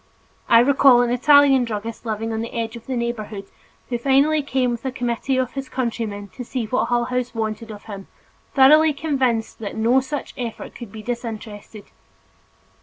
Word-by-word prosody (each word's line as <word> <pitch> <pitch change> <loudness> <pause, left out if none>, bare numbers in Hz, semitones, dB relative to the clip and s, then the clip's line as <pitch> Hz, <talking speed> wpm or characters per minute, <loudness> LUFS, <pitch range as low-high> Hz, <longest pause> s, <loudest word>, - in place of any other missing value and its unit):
I 230 0 +7
recall 260 -1 +5
an 240 - -1
Italian 275 +1 +5
druggist 225 0 -5
living 225 +1 -2
on 220 - -2
the 230 - -5
edge 230 0 -3
of 235 - -11
the 260 -2 -2
neighborhood, 220 -4 -4 0.4
who 240 -2 -2
finally 280 +4 +3
came 260 -3 0
with 235 - -5
a 265 - -2
committee 245 +1 -2
of 255 -1 0
his 270 -1 -5
countryman 225 -5 -3
to 250 - -8
see 245 -1 -3
what 250 +4 0
Hull 240 0 +1
House 250 -1 -3
wanted 220 0 -3
of 210 -1 -9
him, 200 -3 -9 0.5
thoroughly 305 +3 +6
convinced 265 -6 -1
that 210 -3 -6
no 230 +4 +3
such 275 +2 -5
effort 235 -3 -6
could 235 -5 -10
be 215 0 -9
disinterested. 220 -3 -6
240 Hz, 180 wpm, -22 LUFS, 225-265 Hz, 0.5 s, I